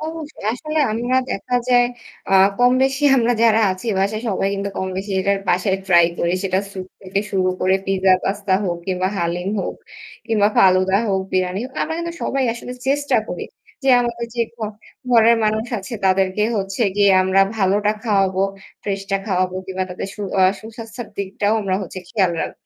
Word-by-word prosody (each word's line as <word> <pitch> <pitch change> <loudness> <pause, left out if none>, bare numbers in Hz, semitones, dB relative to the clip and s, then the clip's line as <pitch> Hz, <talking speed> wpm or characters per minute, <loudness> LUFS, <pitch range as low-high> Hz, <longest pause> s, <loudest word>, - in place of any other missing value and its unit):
অবশ্যই 315 -5 -7
আসলে 305 +6 -3
আমরা 240 +3 0
দেখা 245 +5 -1
যায় 245 -1 +5 0.4
আ - - +1 0.3
কমবেশি 265 +3 +3
আমরা 240 -1 +3
যারা 225 -1 +5
আছি 185 +5 -9
বাসায় 210 +3 0
সবাই 195 -1 0
কিন্তু 200 0 -3
কমবেশি 190 +2 -4
যে 190 - +1
যার 200 0 +3
বাসায় 185 +2 +2
ট্রাই 170 -2 +6
করি। 170 - +1
সেটা 185 -1 +1
স্যুপ 190 -2 -7 0.2
থেকে 195 +1 -1
শুরু 185 -2 +1
করে 190 +1 +3
পিজ্জা, 190 -1 +3
পাস্তা 200 0 -1
হোক 175 -2 -1
কিংবা 185 -1 0
হালিম 175 +2 -2
হোক - - -4 0.5
কিংবা 210 -3 +3
ফালুদা 185 0 +4
হোক, 190 -1 +1
বিরিয়ানি 185 +1 0
হো - - -6
আমরা 320 - -2
কিন্তু 340 0 -4
সবাই 270 -1 0
আসলে 240 +1 -8 0.2
চেষ্টা 285 +1 +1
করি - - -4 0.4
যে 270 - 0
আমাদের 235 -1 -3
যে 240 - -2
ঘ - - -37 0.5
ঘরের 230 -1 +6
মানুষ 215 +1 +1
আছে 195 +4 -7
তাদেরকে 190 +1 +2
হচ্ছে 195 +3 -2
গিয়ে 200 -1 +5
আমরা 190 +1 +3 0.2
ভালোটা 205 +1 +2
খাওয়াবো, 195 -3 +2 0.4
ফ্রেশটা 195 -1 -2
খাওয়াবো। 185 -2 0
কিংবা 190 0 -3
তাদের 180 +2 -5
সু - - -10 0.2
আ - - +6 0.2
সুস্বাস্থ্যের 225 +1 -9
দিকটাও 200 +2 0
আমরা 195 -2 -1
হচ্ছে 185 0 -7
খেয়াল 190 -6 +1
রাখ - - -4
200 Hz, 175 wpm, -20 LUFS, 190-235 Hz, 0.5 s, ট্রাই